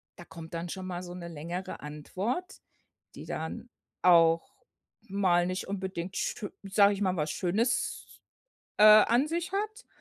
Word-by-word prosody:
da 175 - -12
kommt 165 0 -11
dann 170 +1 -4
schon 190 +1 -6
mal 180 0 -5
so 175 0 -8
'ne 175 -1 -7
längere 170 +4 -6
Antwort, 185 - -4 0.5
die - - -9
dann - - -5 0.3
auch 170 +6 +4 0.4
mal 185 -3 +2
nicht 185 +1 -3
unbedingt, 190 -2 -4
schö 205 - -3
sage 200 +1 +4
ich 200 - -5
mal, 185 -1 +1
was 150 -2 -1
Schönes 220 +8 -1 0.7
an 215 +5 +7
sich 340 +2 -3
hat, 430 +4 -3
185 Hz, 145 wpm, -29 LUFS, 170-215 Hz, 0.7 s, an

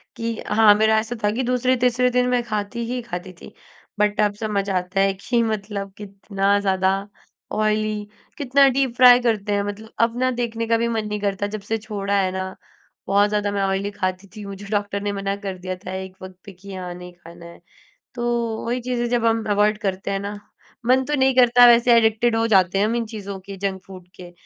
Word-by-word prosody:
कि 230 -1 -3 0.2
हाँ, 210 0 +6
मेरा 220 +1 +3
ऐसा 225 +2 -4
था 205 - +2
कि 245 +5 -2
दूसरे–तीसरे 250 0 +2
दिन 250 0 +2
मैं 250 -1 +2
खाती 215 +1 -3
ही 250 +2 -3
खाती 185 -5 -7
थी। - - -12 0.5
बट 210 0 +1
अब 205 -1 +2
समझ 205 -2 -2
आता 185 0 -1
है 195 0 +3
कि 235 +5 -1
मतलब, 205 -2 -3
कितना 200 0 -1
ज़्यादा 190 -1 +1 0.6
ऑयली 215 0 0 0.3
कितना 275 0 +4
डीप 265 -2 0
फ्राय 250 -1 +8
करते 215 -4 0
हैं। 200 0 +1
मतलब 205 +2 -7
अब 230 +1 +2
ना, 255 0 +2
देखने 230 -2 -3
का 230 0 +3
भी 235 +1 0
मन 225 -2 -2
नहीं 210 0 -3
करता, 200 0 -1
जब 210 0 -6
से 220 +3 -2
छोड़ा 200 -2 -2
है 185 -1 0
ना। 190 0 -5 0.5
बहुत 200 +1 +3
ज़्यादा 205 -1 -1
मैं 200 0 -1
ऑयली 195 +1 -1
खाती 185 0 -3
थी, 210 -1 -8
मुझे 200 0 -8
डॉक्टर 205 -1 -2
ने 205 0 -2
मना 195 0 -2
कर 200 -2 -6
दिया 185 +1 -5
था - - -5
एक 190 0 -7
वक़्त 185 -1 -10
पे 200 - -10
कि 195 +2 -12
हाँ, 180 -1 -6
नहीं 180 0 -10
खाना 170 0 -14
है। 170 0 -13 0.5
तो 235 -2 -2
वही 245 +2 -2
चीज़ 245 0 -2
है, 240 - 0
जब 240 -1 0
हम 225 0 +2
अवॉइड 210 +1 +2
करते 195 -1 -2
हैं 195 - -1
ना, 205 +1 -6 0.5
मन 260 +1 +4
तो 295 - -3
नहीं 265 0 +3
करता 245 -1 +6
वैसे, 240 0 +5
एडिक्टेड 225 +1 +2
हो 225 0 +1
जाते 190 -3 +3
हैं 200 - +3
हम 225 +2 0
इन 235 -1 -1
चीज़ों 200 -3 -7
के, 195 -1 -8
जंक 190 -1 -3
फ़ूड 185 -2 -12
के, 180 -1 -11
210 Hz, 220 wpm, -22 LUFS, 195-235 Hz, 0.6 s, फ्राय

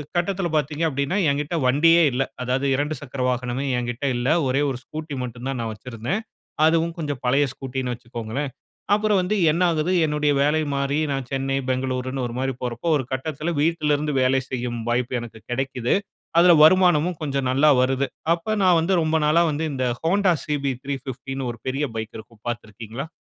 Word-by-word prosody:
கட்டத்தில 180 +1 0
பாத்தீங்க 150 +2 -1
அப்படின்னா, 140 +7 -1
என்கிட்ட 145 +4 -1
வண்டியே 165 +5 +5
இல்ல. 130 +2 +1 0.2
அதாவது 130 +2 0
2 150 +2 -1
சக்கர 135 -1 -6
வாகனமே 125 +2 -2
என்கிட்ட 120 +3 -3
இல்ல. 125 +4 0 0.2
ஒரே 135 +3 +2
ஒரு 125 - -5
ஸ்கூட்டி 155 -1 -6
மட்டும் 120 +1 -6
தான் 130 -3 -3
நான் 115 -1 -3
வச்சிருந்தேன். 125 - -4 0.4
அதுவும் 165 +1 +2
கொஞ்சம் 145 -4 -3
பழைய 140 +3 +3
ஸ்கூட்டின்னு 130 -1 -4
வச்சிக்கொள்ளுங்களேன். 120 +3 -5 0.4
அப்புறம் 210 -2 +3
வந்து 195 +4 0 0.2
என்ன 170 +3 -1
ஆகுது 160 +3 0
என்னுடைய 150 -1 +1
வேலை 155 +2 +2
மாறி 140 +1 0 0.2
நான் 135 -2 -3
சென்னை, 135 0 -1
பெங்களூருன்னு 130 0 -1
ஒரு 115 - -7
மாதிரி 135 0 -1
போறப்போ 125 +6 -4
ஒரு 130 - -2
கட்டத்தில 155 +5 -3
வீட்லிருந்து 150 -2 +1
வேலை 130 +1 +3
செய்யும் 120 -2 -3
வாய்ப்பு 125 +1 0
எனக்கு 115 -1 -10
கிடைக்குது. 125 -1 -1 0.5
அதில 175 0 +7
வருமானமும் 175 -1 +5
கொஞ்சம் 140 -3 -1
நல்லா 145 +4 +4
வருது. 135 +1 +1 0.3
அப்போ 175 +6 -3
நான் 180 -2 +5
வந்து 175 +4 +1
ரொம்ப 160 0 0
நாளா 160 +3 +4
வந்து 150 +2 -2
இந்த 130 -1 -1 0.2
ஹோண்டா 185 +2 +3
CB 145 -2 -2 0.2
350ன்னு 135 -1 -5
ஒரு 115 - -11
பெரிய 140 +3 0
பைக் 110 +1 -5
இருக்கும் 110 0 -16
பாத்திருக்கீங்களா 115 +4 -6
140 Hz, 170 wpm, -23 LUFS, 125-155 Hz, 0.5 s, அதில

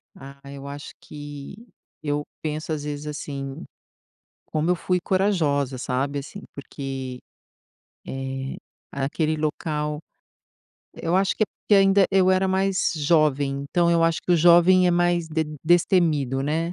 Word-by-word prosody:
Ah, 140 0 -12
eu 140 0 -9
acho 145 +1 -8
que 145 +1 -9 0.5
eu 145 -1 -1 0.2
penso 155 +1 -4
às 150 -2 -2
vezes, 150 0 -5
assim, 140 -2 -6 0.8
como 155 +2 -1
eu 180 - +4
fui 180 +1 0
corajosa, 160 -9 +1
sabe, 135 +3 -2
assim, 200 +9 -9
porque, 135 -2 -6 0.9
eh, 135 0 -4 0.4
aquele 155 +3 -1
local 150 -1 -2 0.9
eu 170 +2 -2
acho 190 0 +2
que - - +2 0.3
ainda 195 0 +5
eu 190 -1 +4
era 190 0 +3
mais 190 0 +1
jovem, 145 -3 +1
então 175 +1 +2
eu 170 -1 +3
acho 165 -1 +2
que - - -1
o 175 - +6
jovem 175 +2 +6
é - - +3
mais 175 -1 +1
de 160 0 -1 0.2
destemido, 160 -6 +2
né. 160 +4 -1
155 Hz, 135 wpm, -24 LUFS, 140-175 Hz, 0.9 s, o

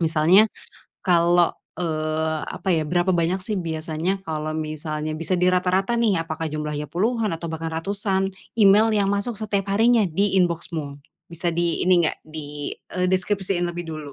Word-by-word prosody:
Misalnya, 165 +6 +5 0.6
kalau, 175 0 +4 0.3
eee, 155 -1 -1
apa, - - -6
ya, 160 -2 +1
berapa 175 +2 +1
banyak, 175 +3 +1
sih, 205 +2 -3
biasanya 165 +2 -2
kalau 155 -1 -3
misalnya 155 0 -4
bisa 165 +3 -3
dirata-rata 185 +4 +2
nih, 215 -7 +2
apakah 165 0 -5
jumlahnya 150 -1 -3
puluhan, 220 +2 0
atau 165 +1 -4
bahkan 165 0 -4
ratusan, 195 +3 -1 0.3
email 210 +1 +6
yang 200 -2 +2
masuk 200 +4 0
setiap 200 -2 -2
harinya 230 0 +4
di 195 +4 +1
inbox-mu? 160 -4 -2 0.3
Bisa 170 +1 -2
di 170 0 0
ini 180 -2 +4
enggak - - 0
di, 150 -2 -6 0.2
eee, 180 0 +1
deskripsiin 190 -1 0
lebih 175 0 -5
dulu. 155 -3 -7
175 Hz, 155 wpm, -23 LUFS, 160-195 Hz, 0.6 s, email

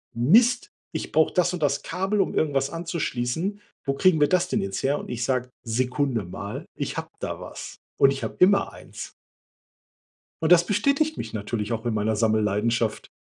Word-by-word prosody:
„Mist, 230 - +4 0.2
ich 160 - -5
brauche 160 +1 +3
das 180 0 +2
und 175 - -4
das 140 -1 +1
Kabel, 190 +4 -1
um - - -1
irgendwas 140 -3 +1
anzuschließen. 170 +2 -2 0.2
Wo 135 - +1
kriegen 165 +3 +3
wir 145 - +5
das 185 -1 +2
denn - - 0
jetzt 95 0 -3
her?" 140 +2 +1
Und - - -9
ich 120 0 -3
sage: 125 -1 0
„Sekunde 125 0 0
mal, 100 +4 -6
ich - - -4
habe - - -4
da - - -4
was." - - -8 0.2
Und 135 - +6
ich 135 - -4
hab - - -6
immer 200 +2 +4
eins. - - -9 1.3
Und 160 - +2
das 175 0 +7
bestätigt 280 +9 +1
mich - - -5
natürlich 105 +1 -3
auch 115 +1 -3
in 115 - 0
meiner 110 0 0
Sammelleidenschaft. 110 +1 +1
140 Hz, 180 wpm, -25 LUFS, 115-180 Hz, 1.3 s, das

